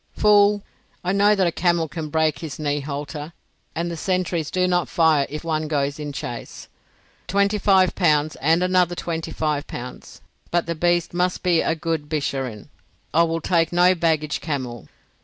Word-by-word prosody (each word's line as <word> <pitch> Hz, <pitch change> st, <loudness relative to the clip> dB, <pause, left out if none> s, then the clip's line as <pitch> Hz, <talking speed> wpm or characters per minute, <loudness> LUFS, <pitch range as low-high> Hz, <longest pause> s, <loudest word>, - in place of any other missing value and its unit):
"Fool! 205 Hz, -1 st, +4 dB, 0.4 s
I 180 Hz, -, 0 dB
know 205 Hz, +2 st, +4 dB
that 190 Hz, -2 st, +2 dB
a 170 Hz, -, +2 dB
camel 170 Hz, -1 st, +1 dB
can 155 Hz, 0 st, -6 dB
break 155 Hz, -3 st, +1 dB
his 155 Hz, -2 st, -6 dB
knee 145 Hz, -1 st, -1 dB
halter, 145 Hz, +2 st, -6 dB, 0.4 s
and 170 Hz, +1 st, -2 dB
the -, -, -4 dB
sentries 175 Hz, -2 st, -1 dB
do 185 Hz, 0 st, +1 dB
not 175 Hz, -1 st, +1 dB
fire 160 Hz, -4 st, +3 dB
if 150 Hz, +3 st, -6 dB
one 155 Hz, -2 st, -1 dB
goes 145 Hz, -1 st, -1 dB
in 150 Hz, -1 st, -4 dB
chase. 120 Hz, -4 st, -7 dB, 0.6 s
Twenty 200 Hz, +2 st, +1 dB
five 190 Hz, -2 st, +4 dB
pounds 155 Hz, -4 st, +2 dB
and 165 Hz, +5 st, +2 dB
another 180 Hz, -1 st, +2 dB
twenty 165 Hz, -2 st, -4 dB
five 150 Hz, -2 st, -2 dB
pounds. 125 Hz, +1 st, -9 dB, 0.3 s
But 175 Hz, 0 st, +1 dB
the 170 Hz, -, -2 dB
beast 175 Hz, +1 st, +1 dB
must 180 Hz, +1 st, 0 dB
be 175 Hz, -3 st, +3 dB
a 165 Hz, -, 0 dB
good 160 Hz, -2 st, -3 dB
Bisharin; 135 Hz, -8 st, -3 dB, 0.4 s
I 165 Hz, -, +5 dB
will 165 Hz, 0 st, 0 dB
take 165 Hz, -1 st, +1 dB
no 175 Hz, +1 st, +5 dB
baggage 160 Hz, -3 st, 0 dB
camel." 130 Hz, -, -4 dB
165 Hz, 175 wpm, -22 LUFS, 150-180 Hz, 0.6 s, I